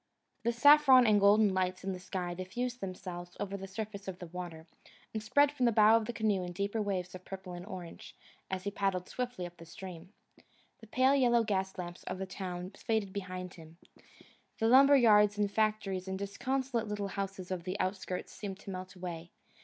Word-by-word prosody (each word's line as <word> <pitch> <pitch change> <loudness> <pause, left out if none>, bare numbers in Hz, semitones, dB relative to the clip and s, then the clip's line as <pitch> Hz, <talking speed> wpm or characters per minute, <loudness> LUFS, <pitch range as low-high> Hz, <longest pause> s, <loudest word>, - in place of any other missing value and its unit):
The 235 - +1
saffron 270 0 +7
and 210 -2 +5
golden 205 0 +5
lights 185 0 -1
in 190 0 -2
the 185 - -6
sky 180 -1 -4
diffused 240 +8 -4
themselves 180 -2 -6
over 200 -1 -3
the 195 0 -6
surface 205 0 -6
of 190 -2 -5
the 180 - -8
water, 170 -2 -7 0.5
and 220 - -2
spread 285 +7 +4
from 260 -4 +1
the - - +4
bow 215 0 +6
of 225 -1 +2
the - - -1
canoe 215 -4 0
in 175 0 -6
deeper 200 +4 -1
waves 185 -3 -2
of 185 0 -9
purple 190 -1 -8
and 175 +2 -8
orange, 180 -5 -9 0.3
as 185 -1 -3
he 200 - -2
paddled 195 -3 -1
swiftly 245 -7 -4
up 175 -1 -10
stream. 175 +1 -10 0.7
The 225 - -14
pale 260 +5 +3
yellow 240 -4 +4
gas 190 -3 -1
lamps 175 -1 -7
of 185 - -4
the 190 - -3
town 185 -1 -6
faded 215 -2 -2
behind 185 -2 -5
him. 165 -1 -14 0.8
The 225 - +1
lumber 275 +4 +7
yards 210 -4 +5
and 205 -1 +1
factories 210 -3 0
and 190 0 -3
disconsolate 240 +4 -2
little 205 -1 -3
houses 195 -1 -5
of 180 -2 -3
the 185 +3 -4
outskirts 185 -1 -3
seemed 195 -3 -6
to 200 - -7
melt 185 0 -7
away. 175 -2 -6
195 Hz, 195 wpm, -32 LUFS, 185-220 Hz, 0.8 s, saffron